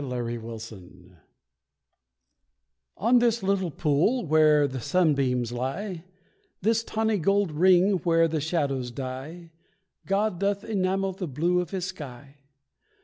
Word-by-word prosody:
THE 140 - -5
LILY 120 -2 -3
POND 100 -6 -11 1.8
On 240 +4 +4
this 235 -2 +1
little 190 -2 0
pool 160 - +1
where 155 -2 +4
the 130 -1 -5
sunbeams 135 -8 +1
lie, 160 - -4 0.5
This 225 +3 +1
tawny 220 -2 -1
gold 195 +1 +1
ring 185 +4 +4
where 165 -1 +3
the 160 -1 -2
shadows 140 -6 -1
die, 135 +7 -7 0.6
God 195 -1 0
doth 200 +1 0
enamel 195 -2 -1
the 185 -1 -5
blue 170 +6 0
of 175 - -6
His 185 -3 -3
sky. 140 -6 -9
165 Hz, 125 wpm, -26 LUFS, 135-195 Hz, 1.8 s, On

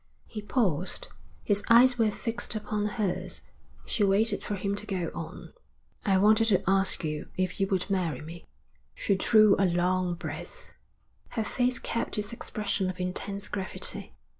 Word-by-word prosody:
He 215 - -7
paused. 195 - 0 0.3
His 205 -1 +2
eyes 245 +2 +7
were 220 -1 +4
fixed 230 +2 -3
upon 210 -1 -2
hers. 200 -2 -3 0.4
She 210 - 0
waited 205 +2 +2
for 205 - -3
him 200 +1 -2
to 210 - -5
go 185 -4 -2
on. - - -8 0.5
'I 195 -1 +4
wanted 215 +3 +5
to 205 -4 +3
ask 195 -1 +3
you 150 -1 -3
if 185 0 -1
you 195 - +2
would 190 -2 0
marry 180 -8 -1
me.' 165 +3 -10 0.5
She 200 - +1
drew 215 +1 +5
a 195 - +4
long 180 0 +1
breath. - - -8 0.7
Her 220 - +2
face 250 +2 0
kept 230 - -3
its 210 +1 -2
expression 205 -4 -2
of 185 0 -6
intense 195 +2 -4
gravity. 190 -2 -3
200 Hz, 160 wpm, -28 LUFS, 185-215 Hz, 0.7 s, eyes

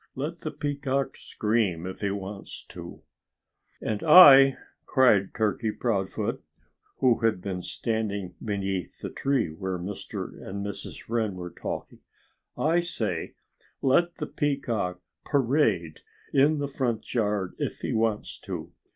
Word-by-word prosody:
Let 155 +6 -4
the 155 - -4
Peacock 140 -2 -2
scream 105 -6 0
if 95 0 -6
he 100 - 0
wants 100 0 -6
to!" - - -10 0.8
"And 105 -2 -2
I 140 -5 +9
" - - -44
cried 110 -8 +4
Turkey 110 0 0
Proudfoot, 100 -5 -2 0.5
who 125 -3 +3
had 115 -4 +2
been 90 -1 -4
standing 100 -3 -2
beneath 95 -4 -3
the - - -5
tree 135 - 0
where 90 +4 -4
Mr. 95 +3 -6
and 100 +1 -5
Mrs. 100 -1 -6
Wren 110 -4 0
were 90 -1 -6
talking - - -6 0.6
"I 165 +3 +3
say, 110 - -3 0.5
let 170 +6 +3
the 150 - -4
Peacock 120 -13 -1 0.2
parade 115 - +1 0.3
in 145 +3 +4
the 145 -1 -1
front 125 -5 -2
yard 105 -5 0
if - - -3
he - - -2
wants 110 -1 -1
to. - - -6
110 Hz, 135 wpm, -27 LUFS, 95-135 Hz, 0.8 s, I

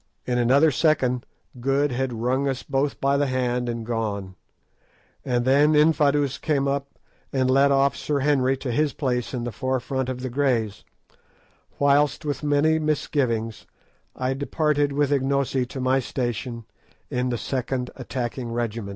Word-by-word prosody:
In 125 -1 0
another 140 +6 +4
second 130 -4 +1 0.3
Good 135 +3 +1
had 130 +1 -1
wrung 125 +4 0
us 135 -2 -2
both 140 0 -1
by 140 +1 +2
the 145 0 +1
hand 125 -1 -1
and 115 -1 -4
gone; 105 -5 -3 0.9
and 120 -1 0
then 145 +4 +4
Infadoos 150 -3 +3
came 140 -3 0
up 140 0 -3 0.3
and 130 -1 +1
led 140 +1 +4
off 140 0 +3
Sir 145 -2 -1
Henry 135 -2 +2
to 130 -1 -4
his 150 +4 +1
place 125 -4 -2
in 125 -3 -3
the 120 - -3
forefront 130 +1 -2
of 125 -1 -4
the 130 - -3
Greys, 120 -6 0 0.9
whilst, 145 +1 +2
with 145 -1 -2
many 150 +2 +2
misgivings, 130 -7 -1 0.5
I 130 +1 -1
departed 145 +1 0
with 145 0 +1
Ignosi 135 -2 +1
to 130 - -7
my 130 +1 +2
station 120 -2 -4 0.5
in 125 0 0
the 120 - -1
second 125 0 -3
attacking 125 -1 -4
regiment. 115 -3 -3
130 Hz, 150 wpm, -24 LUFS, 125-140 Hz, 0.9 s, another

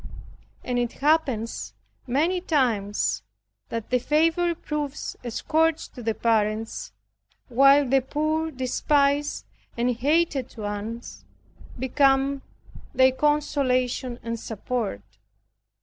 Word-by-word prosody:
And 245 -1 -1
it 240 -1 -1
happens 275 -7 0 0.3
many 325 +9 +1
times, 230 - 0 0.5
that 230 0 -5
the 250 - +3
favorite 330 +5 +1
proves 295 -2 -3
a 245 - -4
scourge 320 +6 +1
to 250 - -10
the 225 -1 -1
parents 215 - 0 0.6
while 275 +3 +6
the 270 +1 +3
poor 310 +4 -1
despised 280 +2 +1 0.3
and 240 +1 +2
hated 285 0 +1
one 210 +2 -4 0.7
becomes 270 +1 +2 0.5
their 260 0 +6
consolation 255 -3 0
and 230 0 -3
support. 220 - -3
260 Hz, 100 wpm, -25 LUFS, 235-295 Hz, 0.7 s, while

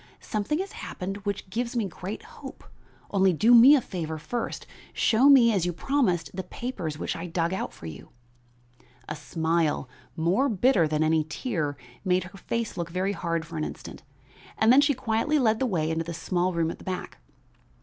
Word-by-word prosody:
Something 215 +8 -2
has 385 +3 -4
happened 195 +1 -6
which 200 -1 -3
gives 240 +4 -2
me 230 -3 +1
great 190 - -7
hope; 460 +1 -11 0.5
only 190 -2 +3
do 220 +9 +4
me 245 +5 +9
a 275 - +2
favor 160 -7 -5
first; 230 +9 -4 0.3
show 245 +5 +4
me, 240 -5 +7
as 190 -4 +1
you - - 0
promised, 180 - 0
the 190 - -3
papers 180 - -5
which - - -3
I 170 +1 -5
dug 170 +1 -1
out 190 - -3
for - - -13
you." 80 -3 -9 1.0
A 150 - -4
smile, 160 -1 0 0.3
more 180 +12 +2
bitter 215 -5 +3
than 155 0 0
any 155 0 +2
tear, 155 - -3 0.3
made 185 -1 +2
her 185 +1 -11
face 230 +4 -3
look 170 -1 -3
very 185 +3 -1
hard 170 -2 -2
for 165 +1 -8
an 155 - -1
instant, - - -7 0.6
then 245 +5 +6
she 285 -1 +2
quietly 245 +5 0
led 225 -5 +2
the 265 - +1
way 165 -7 0
into 160 0 -1
the 170 0 -5
small 180 +2 0
room 165 -2 0
at - - -9
the - - -12
back. 185 -1 -5
185 Hz, 190 wpm, -26 LUFS, 165-235 Hz, 1.0 s, me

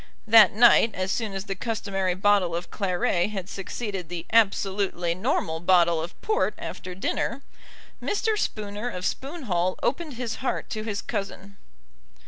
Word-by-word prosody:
That 220 -3 +8
night, 230 0 +6
as 185 +1 -2
soon 220 -3 -2
as 195 0 -3
the 195 - -3
customary 195 -3 -2
bottle 195 -3 +2
of 175 +1 -5
claret 180 -1 0
had 195 -4 -5
succeeded 195 -2 -5
the 175 -1 -5
absolutely 195 -5 +2
normal 175 - -1
bottle 170 -2 +4
of 170 +2 -7
port 435 0 +1
after 180 0 -7
dinner, 235 +7 -2 0.6
Mr. 430 +1 0
Spooner 210 - -3
of 180 -5 -5
Spoon 290 +4 -3
Hall 180 -4 0
opened 310 0 -1
his 235 -2 -4
heart 260 - -3
to 215 - -3
his 215 -2 -4
cousin. 200 0 -5
200 Hz, 150 wpm, -25 LUFS, 180-225 Hz, 0.6 s, That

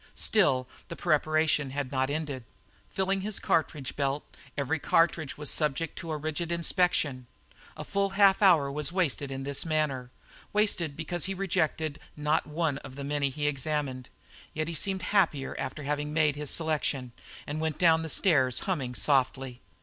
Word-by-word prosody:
Still 135 -12 +2 0.2
the 170 - -6
preparation 155 -3 +2
had 135 -1 -3
not 130 -1 0
ended. 145 -4 -3 0.5
Filling 190 0 0
his 210 +1 -2
cartridge 150 -4 -1
belt, 140 0 -1 0.3
every 145 +3 0
cartridge 160 -2 +2
was 150 -1 -1
subject 150 +1 +1
to 165 -3 -6
a 155 - -1
rigid 155 +3 -3
inspection. 170 -7 +1 0.5
A - - -5
full 200 0 0
half 200 -1 +6
hour 165 -8 +5
was 150 +2 0
wasted 155 -6 0
in 135 0 -5
this 140 0 0
manner. 150 -6 -1 0.4
Wasted, 180 -8 +1
because 165 +1 -2
he 195 +1 -2
rejected 160 -5 -1 0.2
not 150 +1 +1
one 150 -2 -1
of 130 -3 -11
the 140 - -6
many 145 0 0
he 145 +2 -3
examined. 140 -3 -2 0.5
Yet 155 0 -1
he 170 - -3
seemed 190 +4 -1
happier 165 -9 +1
after 150 - -4
having 150 +1 -2
made 155 -2 +3
his 150 -1 -3
selection, 150 -6 -1 0.3
and 150 +2 -4
went 160 -2 -1
down 165 -2 +5
the 160 - -4
stairs, 135 -9 +3
humming 135 -10 -2
softly. 130 -2 +1
150 Hz, 165 wpm, -29 LUFS, 140-165 Hz, 0.5 s, half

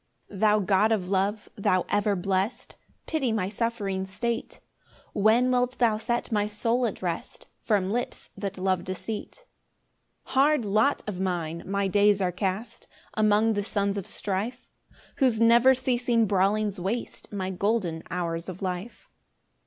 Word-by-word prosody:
1 195 - -9
Thou 215 0 +4
God 200 +3 +3
of 190 -5 0
love, 200 +2 0
thou 185 -3 +1
ever 205 0 +1
blest, 190 +4 -2 0.3
Pity 280 -7 0
my 200 -4 0
suffering 205 -3 -2
state; 230 +4 -3 0.5
When 225 +5 +4
wilt 250 0 +1
thou 225 -3 +3
set 240 +2 -2
my 210 -1 +1
soul 230 +3 0
at 205 - -6
rest 170 -2 -4 0.2
From 200 -3 +1
lips 245 +2 -3
that 195 -1 -5
love 185 -1 0
deceit? 215 - -6 0.8
2 - - -14
Hard 275 -2 +3
lot 215 +7 +2
of 205 -4 -5
mine! 170 -3 -2
my 200 0 0
days 205 +1 +4
are 185 -2 +1
cast 195 +5 -4 0.3
Among 215 +1 +3
the 205 -1 -1
sons 200 -1 0
of 200 -3 -4
strife, 210 +6 -4 0.5
Whose 250 -5 +3
never 235 +3 +6
ceasing 245 -2 +1
brawlings 200 +1 +1
waste 205 +7 -4
My 190 -2 -3
golden 190 -4 0
hours 170 0 -3
of 185 +2 -7
life. 185 +5 -5
205 Hz, 150 wpm, -27 LUFS, 190-230 Hz, 0.8 s, never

